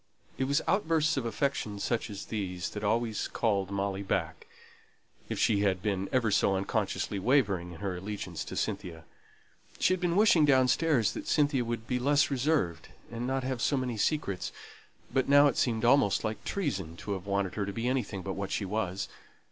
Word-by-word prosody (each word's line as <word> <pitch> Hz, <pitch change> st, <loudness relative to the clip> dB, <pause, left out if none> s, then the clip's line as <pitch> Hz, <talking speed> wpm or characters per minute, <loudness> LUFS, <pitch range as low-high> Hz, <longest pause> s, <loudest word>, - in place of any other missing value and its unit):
It 135 Hz, -, +2 dB
was 140 Hz, +3 st, +1 dB
outbursts 160 Hz, -5 st, +2 dB
of 130 Hz, -4 st, -1 dB
affection 115 Hz, -3 st, -1 dB
such 115 Hz, +3 st, -1 dB
as 100 Hz, -2 st, -7 dB
these 95 Hz, -4 st, -4 dB
that 105 Hz, -, -6 dB
always 110 Hz, +1 st, 0 dB
called 100 Hz, -4 st, 0 dB
Molly 100 Hz, 0 st, -2 dB
back, 80 Hz, -5 st, -2 dB, 0.8 s
if -, -, -3 dB
she 105 Hz, -3 st, +3 dB
had 95 Hz, -2 st, +1 dB
been 100 Hz, -2 st, -1 dB
ever 120 Hz, -4 st, +2 dB
so 100 Hz, -1 st, +3 dB
unconsciously 100 Hz, +1 st, -1 dB
wavering 100 Hz, -7 st, +1 dB
in 80 Hz, -, -11 dB
her 100 Hz, -2 st, -2 dB
allegiance 90 Hz, -3 st, -5 dB
to -, -, -7 dB
Cynthia. 80 Hz, -2 st, -3 dB, 0.7 s
She -, -, +3 dB
had 185 Hz, -, -1 dB
been 175 Hz, -1 st, +1 dB
wishing 200 Hz, -6 st, +5 dB
downstairs 130 Hz, -2 st, +3 dB
that -, -, -6 dB
Cynthia 145 Hz, -4 st, +2 dB
would 115 Hz, -1 st, -4 dB
be 125 Hz, +1 st, -1 dB
less 145 Hz, +3 st, +3 dB
reserved, 130 Hz, -, 0 dB, 0.2 s
and 120 Hz, +1 st, -4 dB
not 135 Hz, 0 st, -1 dB
have 130 Hz, -2 st, -2 dB
so 140 Hz, -, +2 dB
many 125 Hz, -2 st, -2 dB
secrets; 105 Hz, -, -1 dB, 0.6 s
but 130 Hz, 0 st, +1 dB
now 145 Hz, +1 st, +7 dB
it 145 Hz, -, +3 dB
seemed 115 Hz, -2 st, +1 dB
almost 125 Hz, -5 st, +4 dB
like 110 Hz, 0 st, -3 dB
treason 95 Hz, -, -3 dB
to 105 Hz, -, -6 dB
have 95 Hz, -1 st, -4 dB
wanted 100 Hz, -2 st, 0 dB
her 105 Hz, -2 st, -2 dB
to -, -, -2 dB
be 115 Hz, +4 st, -3 dB
anything 115 Hz, -7 st, -1 dB
but 95 Hz, -, -3 dB
what 100 Hz, 0 st, -4 dB
she 100 Hz, -, -1 dB
was. 100 Hz, -1 st, -2 dB
110 Hz, 190 wpm, -30 LUFS, 100-135 Hz, 0.8 s, now